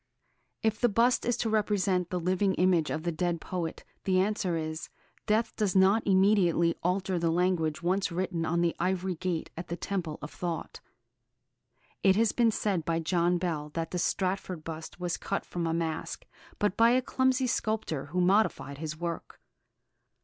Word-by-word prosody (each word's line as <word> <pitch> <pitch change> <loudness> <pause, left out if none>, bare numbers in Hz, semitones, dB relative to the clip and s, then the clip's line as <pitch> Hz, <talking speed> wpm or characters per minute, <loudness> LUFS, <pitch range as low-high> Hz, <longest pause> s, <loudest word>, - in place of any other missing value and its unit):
If 220 -1 0
the 240 - +4
bust 235 +4 +3
is 240 -1 +1
to 230 - -1
represent 200 -4 +1
the 180 - -1
living 185 +2 +1
image 180 -4 +3
of 155 - -3
the 170 - 0
dead 170 +1 -1
poet, 170 -2 -4 0.2
the 185 -1 +3
answer 190 -2 0
is, 155 0 -4 0.4
death 220 +2 +1
does 205 -3 0
not 195 +4 +5
immediately 190 -4 +4
alter 185 0 0
the 165 0 +1
language 170 -2 +1
once 185 +1 +1
written 175 -1 -2
on 170 +1 +1
the 170 -1 +1
ivory 185 +1 0
gate 175 -1 -3
at 170 +1 -6
the 170 - -3
temple 175 -5 -3
of 145 - -6
thought. 170 -2 -4 1.2
It 190 -1 +5
has 225 0 +3
been 235 -2 +3
said 205 -5 0
by 165 +1 0
John 175 +1 +1
Bell 160 -4 -2
that 165 -1 -2
the 180 - -2
Stratford 185 -2 -1
bust 160 +2 -7
was 175 -1 -2
cut 195 - -3
from 170 -1 -3
a - - 0
mask, 165 -1 -3 0.3
but 205 -1 +1
by 230 +2 +5
a 250 +2 +4
clumsy 260 +1 +1
sculptor, 215 - -1
who 180 +5 -1
modified 180 -7 +2
his 155 -1 -5
work. 170 -1 -5
180 Hz, 175 wpm, -29 LUFS, 165-200 Hz, 1.2 s, not